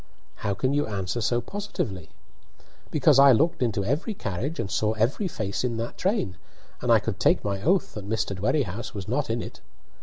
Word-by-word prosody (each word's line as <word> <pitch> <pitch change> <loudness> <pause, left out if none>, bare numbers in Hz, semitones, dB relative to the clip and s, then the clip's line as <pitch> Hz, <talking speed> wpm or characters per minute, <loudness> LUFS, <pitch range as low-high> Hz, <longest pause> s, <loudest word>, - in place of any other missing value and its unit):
"How 100 - -2
can 130 +7 0
you 145 +1 +1
answer 100 +2 -2
so 120 +2 +1
positively?" 130 - -4 0.8
"Because 150 -2 +4
I 140 0 +9
looked 160 +7 +2
into 105 -5 0
every 150 - -1
carriage 125 - -3
and 95 - -2
saw 110 0 +1
every 120 - 0
face 105 - -3
in 120 -2 -1
that 115 +1 -4
train, 190 - 0 0.4
and - - +1
I - - +8
could - - -3
take - - +3
my 100 -1 -2
oath 185 - +2
that 105 -1 -7
Mr. 110 -2 -1
Dwerrihouse 110 - -1
was 100 -3 -5
not - - -1
in - - -1
it. - - -10
115 Hz, 190 wpm, -26 LUFS, 100-145 Hz, 0.8 s, I